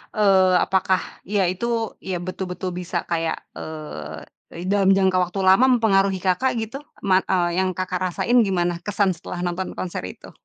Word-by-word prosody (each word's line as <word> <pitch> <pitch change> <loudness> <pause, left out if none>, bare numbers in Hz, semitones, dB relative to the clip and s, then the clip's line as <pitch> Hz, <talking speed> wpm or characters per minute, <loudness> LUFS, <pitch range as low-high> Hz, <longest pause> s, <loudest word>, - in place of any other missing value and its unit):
Eee, 190 -3 +4
apakah 190 -2 +1 0.3
ya 200 -1 +1
itu, 230 +3 -2
ya 185 -2 -4
betul-betul 185 0 -4
bisa 180 -1 -3
kayak, 165 -1 -1 0.2
eee, 155 - -9
dalam 195 -1 +4
jangka 190 -1 +3
waktu 180 +2 -4
lama 190 +7 +6
mempengaruhi 195 -4 +2
Kakak 190 +8 +1
gitu? 225 +5 -5 0.2
Man 190 -1 +4
eee, 175 -1 +1
yang 185 -1 0
Kakak 185 -1 -2
rasain 240 +7 +2
gimana 175 -2 0
kesan 200 -2 +1
setelah 175 +1 -7
nonton 180 +1 -3
konser 175 - -4
itu? - - -11
185 Hz, 155 wpm, -22 LUFS, 175-195 Hz, 0.3 s, lama